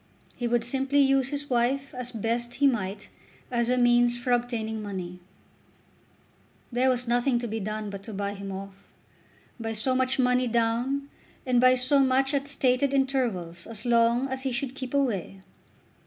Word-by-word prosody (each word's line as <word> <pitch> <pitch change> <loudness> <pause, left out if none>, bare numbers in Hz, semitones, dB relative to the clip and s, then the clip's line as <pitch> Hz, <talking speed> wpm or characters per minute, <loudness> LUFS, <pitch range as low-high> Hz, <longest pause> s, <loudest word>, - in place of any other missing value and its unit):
He 240 - -2
would 235 0 +1
simply 270 +3 +1
use 270 -1 +3
his 290 0 -4
wife 260 +3 0
as 250 -1 -5
best 235 +2 -2
he 285 - +2
might 210 -6 0 0.4
as 235 -1 +1
a 250 - +2
means 240 0 +4
for 245 +1 -3
obtaining 235 -3 -1
money. 185 -3 -6 1.5
There 250 +2 +2
was 250 -1 0
nothing 245 +2 +2
to 240 0 -3
be 225 0 -3
done 215 0 -4
but 200 -1 -7
to 220 - -7
buy 200 0 -3
him 195 -1 -7
off, 195 +1 -7 0.9
by 225 -1 -3
so 225 +4 0
much 260 +1 +1
money 250 -1 +2
down, 240 +4 0 0.4
and 250 -2 +3
by 255 0 +6
so 255 +3 +2
much 270 +1 +2
at 280 0 0
stated 275 0 +1
intervals 230 -12 -1
as 225 0 -3
long 235 +2 +3
as 265 0 -3
he 265 -1 -2
should 265 +1 -2
keep 265 0 -5
away. 200 -8 -1
245 Hz, 170 wpm, -27 LUFS, 225-265 Hz, 1.5 s, by